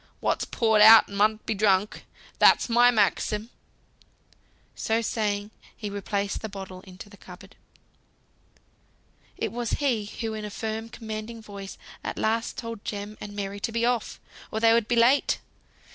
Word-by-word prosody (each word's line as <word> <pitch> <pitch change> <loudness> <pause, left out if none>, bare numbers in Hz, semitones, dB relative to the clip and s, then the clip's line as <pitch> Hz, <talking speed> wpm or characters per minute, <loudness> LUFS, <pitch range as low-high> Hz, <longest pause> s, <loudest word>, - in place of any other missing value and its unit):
What's - - 0
poured 220 -2 +2
out 220 +1 +9
mun 210 +2 +1
be - - -1
drunk. 200 -1 +1 0.3
That's - - +5
my 240 +1 +5
maxim." 215 0 0 1.2
So 225 +1 0
saying, 210 -2 -2 0.3
he 210 -2 -5
replaced 200 0 -3
the 220 - -5
bottle 190 -2 -9
in 185 -1 -13
the 205 +1 -12
cupboard. 190 +2 -14 1.8
It - - -2
was 240 0 -3
he 245 -8 0
who 220 +2 -5
in 215 -1 -5
a 210 - -5
firm 220 +2 -5
commanding 220 +1 -7
voice 200 -3 -9 0.3
at - - -5
last 225 +1 -1
told 230 -3 -6
Jem 205 0 -5
and 205 -1 -7
Mary 200 0 -4
to 230 - -3
be 230 +1 0
off, 245 -2 -1 0.3
or 220 - -3
they 225 0 +5
would 230 -2 +2
be 240 - +1
too 230 - +5
late. 260 +5 +3
215 Hz, 160 wpm, -26 LUFS, 205-230 Hz, 1.8 s, out